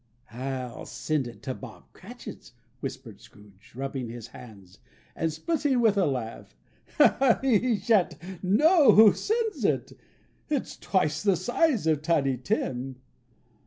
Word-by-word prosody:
"I'll 130 -1 -5
send 150 -5 -2
it 120 - -12
to 130 - -3
Bob - - -12
Cratchit's," - - -11 0.3
whispered - - -8
Scrooge, 100 -2 -19
rubbing 135 -2 -4
his 115 -1 -8
hands, 100 -5 -14 0.4
and 165 0 -1
splitting 285 - 0
with 225 -3 +3
a 195 -4 +2
laugh. 120 - -5 0.9
"He 245 -2 +2
shan't 185 -5 -1
know 295 - +5
who 215 -1 +8
sends 435 - -2
it. - - 0 0.6
It's 290 -4 -2
twice 155 -6 0
the 200 -2 +3
size 245 - +1
of 155 -2 +1
Tiny 145 -5 +1
Tim. 130 - -3
160 Hz, 125 wpm, -27 LUFS, -, 0.9 s, who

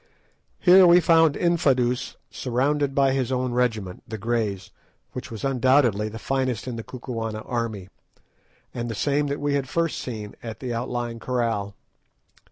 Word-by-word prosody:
Here 185 0 +7
we 175 +1 +7
found 165 -3 +4
Infadoos 130 -8 +1 0.2
surrounded 135 +3 0
by 135 -1 +3
his 130 -2 -1
own 130 -1 0
regiment, 110 -7 -1
the 110 - -5
Greys, 105 -4 -2 0.4
which - - -7
was 110 -2 -8
undoubtedly 130 -5 +3
the 110 - -8
finest 130 -2 -2
in 125 - -3
the 115 - -6
Kukuana 115 -4 -5
army, 115 -6 -3 0.9
and 120 -1 -4
the 115 - -4
same 145 +5 +1
that 140 0 -3
we 145 0 0
had 140 -2 -1
first 165 -1 0
seen 110 -4 -6
at 115 -2 -7
the 125 -2 -4
outlying 120 0 -3
kraal. 115 -5 -2
125 Hz, 155 wpm, -24 LUFS, 115-140 Hz, 0.9 s, Here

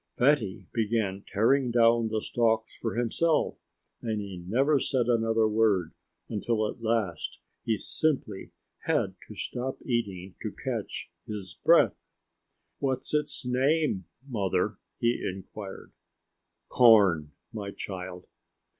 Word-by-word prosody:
Fatty 125 -7 +2
began 105 -3 0
tearing 125 +5 +3
down 115 -1 +4
the 110 -1 -2
stalks 115 -1 +1
for 115 - -3
himself 150 +7 +1 0.4
and 110 -2 -2
he 95 -4 -6
never 135 +8 +3
said 130 -2 +1
another 115 -2 +2
word 105 -6 +2 0.3
until 110 0 0
at 115 - -7
last 110 -7 -1 0.3
he 110 -2 +1
simply 130 -7 -1 0.4
had - - +1
to - - -10
stop 130 +2 -4
eating 100 -7 -2
just - - -5
to - - -12
catch - - -4 0.2
his 100 -4 -6
breath. - - +6 0.9
"What's 130 0 -1
its 150 -3 0
name, 130 - +1 0.2
Mother?" 100 -4 0 0.2
he 120 0 +1
inquired. 95 +1 -7 0.8
"Corn, 100 - +5 0.2
my 105 -3 -4
child." 90 -2 -6
110 Hz, 120 wpm, -28 LUFS, 100-125 Hz, 0.9 s, breath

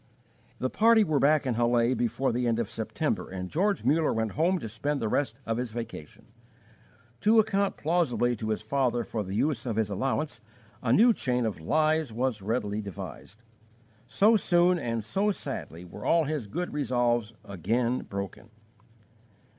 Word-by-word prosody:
The 130 - -2
party 225 0 +5
were 155 -7 +1
back 145 +1 +3
in 125 - 0
Halle 120 +1 +2
before 120 +2 0
the 120 +1 0
end 115 -1 +1
of 115 -3 -2
September, - - -2
and 90 -1 -6
George 200 +5 +1
Muller 155 +2 +2
went 110 -1 -1
home 175 +5 +1
to 135 - -6
spend 140 +7 -2
the 115 - -1
rest 120 0 -1
of 115 0 -1
his 125 0 -2
vacation. 115 -9 -8 0.9
To 220 - +4
account 200 -2 +2
plausibly 150 -7 +1
to 110 +1 -4
his 110 0 -2
father 120 0 0
for 110 -2 -3
the 95 +1 -5
use 135 0 0
of 115 - -1
his 110 -2 0
allowance 135 +8 -2 0.4
a 115 - 0
new 230 - +6
chain 125 - -1
of 110 -6 -3
lies 155 - +1
was 120 -1 -1
readily 105 0 -2
devised. 100 - -9 0.6
So 210 - +4
soon 175 -2 +3
and 115 -4 -2
so 195 - 0
sadly 85 - -6
were 105 +4 -10
all 165 -1 +3
his 150 -6 -3
good 175 - -4
resolves 120 -5 0
again 115 +7 -1
broken. 100 +3 -7
120 Hz, 170 wpm, -28 LUFS, 110-155 Hz, 0.9 s, new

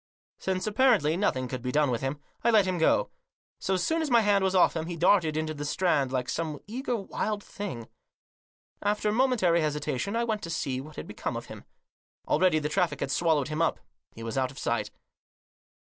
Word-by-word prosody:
Since, 185 -1 -2
apparently, 215 - +3
nothing 130 -10 0
could 130 0 -5
be 125 +1 -2
done 145 -1 +2
with 120 - -1
him, 135 +2 -2 0.2
I 235 - +4
let 215 -4 +5
him 185 -2 -1
go. - - +3 0.5
So 190 - 0
soon 320 - 0
as 315 - -1
my 235 -2 +5
hand 205 -2 +3
was 190 0 +1
off 180 - +5
him 160 0 -2
he 175 - -4
darted 170 -3 +3
into 155 0 -1
the 145 -1 -6
Strand 145 -4 +1
like 125 -1 -1
some 160 0 -2
eager 245 +3 -3
wild 205 0 -3
thing. 170 - -6 0.9
After 210 +1 +1
momentary 220 -8 +3
hesitation 150 - -2
I 235 - +1
went 220 -3 -1
to 170 - -6
see 130 -5 -2
what 155 +2 -12
had - - -6
become - - -4
of - - -6
him. - - -12 0.6
Already 185 -4 +3
the 150 -1 -1
traffic 175 +2 0
had - - -2
swallowed 155 -5 +2
him 155 +1 -2
up. 165 - +1 0.4
He 115 - -8
was 115 +3 -2
out 130 -1 0
of 135 - -13
sight. - - -1
170 Hz, 205 wpm, -28 LUFS, 150-205 Hz, 0.9 s, let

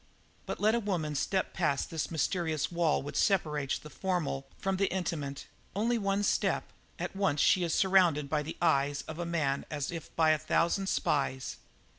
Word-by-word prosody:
But - - -4
let 215 +1 +3
a 235 - +2
woman 175 -8 -2
step 185 +7 -1
past 150 -7 0
that 160 -2 -2
mysterious 160 -1 -1
wall 170 -4 +1
which 145 0 -7
separates 150 -6 +1
the 150 - -12
formal 165 -6 -2
from 195 -1 -1
the 195 +1 +1
intimate 155 -7 -3 0.3
only 230 +3 +1
one 200 0 0
step - - 0 0.2
at - - -4
once 195 -7 +1
she 185 - +4
is 170 - 0
surrounded 180 -7 +4
by 150 +1 0
the 155 +2 -6
eyes 145 -3 +2
of 160 +1 -8
a 175 - -2
man 150 -5 0
as 145 0 -3
if 165 -2 -6
by 160 -1 +4
a 155 - +2
thousand 170 +5 +1
spies. 130 -2 0
165 Hz, 180 wpm, -31 LUFS, 145-190 Hz, 0.3 s, she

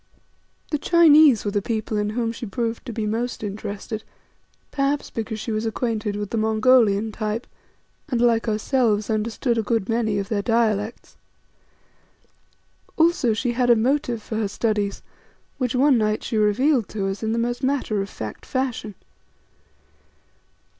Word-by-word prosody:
The 300 - 0
Chinese 310 -8 +6
were 205 - 0
the 205 0 0
people 220 0 -3
in 210 0 0
whom 230 -2 0
she 230 0 -7
proved 230 +3 -3
to - - -3
be 220 -1 -3
most 230 +2 -2
interested, 210 +1 -5 0.7
perhaps 280 +1 -1
because 220 -1 -4
she 225 - -4
was 215 0 -1
acquainted 225 -2 -2
with 205 -1 -4
the 230 - -1
Mongolian 220 -1 +3
type, 215 +2 -3 0.6
and 245 -5 0
like 235 -1 +2
ourselves, 215 -1 +1
understood 230 +2 0
a - - +2
good 220 -2 -1
many 225 -3 0
of 200 -1 -2
their 210 -1 -1
dialects. 220 -1 -1 1.8
Also 320 -8 +3
she 240 +3 -1
had 245 0 +1
a 240 - +7
motive 240 -1 0
for 220 - -4
her 220 -2 0
studies, 205 -1 -1 0.6
which 255 -2 -1
one 265 -1 +4
night 215 0 0
she - - -3
revealed 220 +4 +2
to 200 -2 -3
us 195 +1 -3
in 220 -1 -1
the 230 - 0
most 240 +1 -1
matter 260 -6 0
of 195 - -5
fact 110 -1 -7
fashion. 250 -6 -3
225 Hz, 155 wpm, -23 LUFS, 210-245 Hz, 1.8 s, a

